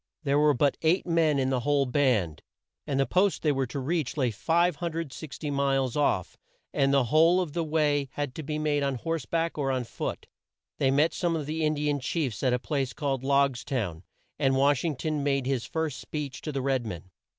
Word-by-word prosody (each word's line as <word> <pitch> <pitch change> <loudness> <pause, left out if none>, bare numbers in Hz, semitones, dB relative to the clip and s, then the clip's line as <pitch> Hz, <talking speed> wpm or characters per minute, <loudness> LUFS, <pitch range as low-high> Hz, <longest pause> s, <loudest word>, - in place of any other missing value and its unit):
There 140 -1 +2
were 150 -1 +4
but 140 +2 +2
eight 165 +4 +2
men 165 -4 +2
in 135 -1 +1
the 130 - +1
whole 140 +2 +2
band, 120 - +1 0.5
and 135 -1 0
the 135 - +3
post 190 +5 +1
they 150 - +3
were 135 -2 0
to 120 - -6
reach 150 +1 -2
lay 130 -4 +1
560 160 - -1
miles 135 -3 +1
off, 140 - 0 0.4
and 135 0 +2
the 140 -1 +4
whole 160 +8 +4
of 170 -6 -2
the 170 0 0
way 150 -3 +1
had 145 -3 -3
to 160 - -6
be 150 +1 -3
made 150 -1 0
on 140 -1 0
horse 160 -1 -3
back 165 -1 -1
or 135 -2 0
on 130 -1 0
foot. 115 - -5 0.5
They 135 - +3
met 145 +5 +3
some 170 -2 0
of 155 -3 -3
the 155 +2 -2
In 155 0 +2
di 150 0 -2
an 145 -1 +1
chiefs 130 - -2
at 130 - +2
a 125 - +2
place 135 -1 -2
called 135 -4 -2
Logs 140 -2 +2
town 100 - -3 0.4
and 135 0 +2
Wash 140 0 +3
ing 160 -4 -1
ton 150 +3 -2
made 140 -2 +1
his 130 -3 -1
first 160 -4 -3
speech 145 -4 -5
to 155 - -4
the 135 -2 -3
red 135 -2 +1
men. 95 -4 -7
140 Hz, 215 wpm, -27 LUFS, 130-155 Hz, 0.5 s, were